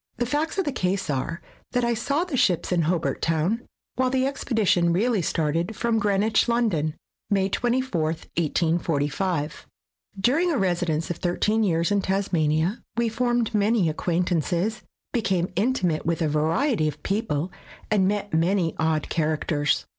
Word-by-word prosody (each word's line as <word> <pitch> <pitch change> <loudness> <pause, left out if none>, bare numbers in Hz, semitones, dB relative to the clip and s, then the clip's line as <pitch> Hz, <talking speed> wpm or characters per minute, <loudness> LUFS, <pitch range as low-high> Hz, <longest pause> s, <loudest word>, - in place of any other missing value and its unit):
The 240 - 0
facts 295 +8 -1
of 385 - +1
the 290 - 0
case 190 - -1
are, 165 +6 -3 0.3
that 245 -1 +2
I 235 - +2
saw 280 +8 0
the 355 -6 -4
ships 185 -9 +2
in 175 -1 +3
Hobart 165 +1 0
Town, 165 +8 +1 0.4
while 255 0 +2
the 260 0 +1
expedition 220 -10 +1
really 210 +4 +2
started 165 +5 -1
from 230 -1 +1
Greenwich, 210 +1 +2
London, 180 -11 +1 0.3
May 195 -1 +2
24, 245 -4 0
1845. 160 -1 -1 0.5
During 305 - +2
a 300 - +1
residence 175 -5 0
of 170 - -4
thirteen 210 +5 +1
years 170 -2 +1
in 200 -1 +2
Tasmania, 180 -1 0 0.2
we 235 -1 +2
formed 240 0 0
many 210 -3 +2
acquaintances, 175 +4 0 0.3
became 190 -7 0
intimate 190 -8 +1
with 165 0 0
a - - +2
variety 155 - +1
of 150 0 -5
people, 190 -5 -1 0.4
and 195 -3 +3
met 205 -1 -2
many 170 +1 +2
odd 160 -2 +1
characters. 150 -2 0
190 Hz, 145 wpm, -25 LUFS, 165-230 Hz, 0.5 s, in